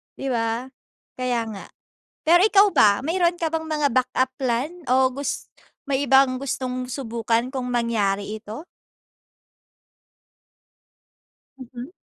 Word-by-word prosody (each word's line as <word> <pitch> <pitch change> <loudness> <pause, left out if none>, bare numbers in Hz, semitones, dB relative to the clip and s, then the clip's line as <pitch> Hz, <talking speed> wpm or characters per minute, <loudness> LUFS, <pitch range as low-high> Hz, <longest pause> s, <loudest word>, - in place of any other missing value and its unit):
'di 275 - -5
ba? 230 +2 -2 0.5
Kaya 250 -2 0
nga. 200 - -8 0.6
Pero 340 +2 +5
ikaw 405 -1 +6
ba, 205 - +4
mayroon 345 +3 +1
ka 330 -2 -2
bang 320 0 -3
mga 300 -2 0
backup 255 +1 +1
plan 255 +2 -1 0.2
o 260 +1 +3
gus 280 +2 -5 0.4
may 275 +1 +1
ibang 265 -1 +4
gustong 255 -2 -3
subukan, 235 -1 -1
kung 260 -2 -3
mangyari 215 -4 -1
ito? 220 +9 -8 3.0
Mm. 255 +3 -9
255 Hz, 115 wpm, -23 LUFS, 235-280 Hz, 3.0 s, ikaw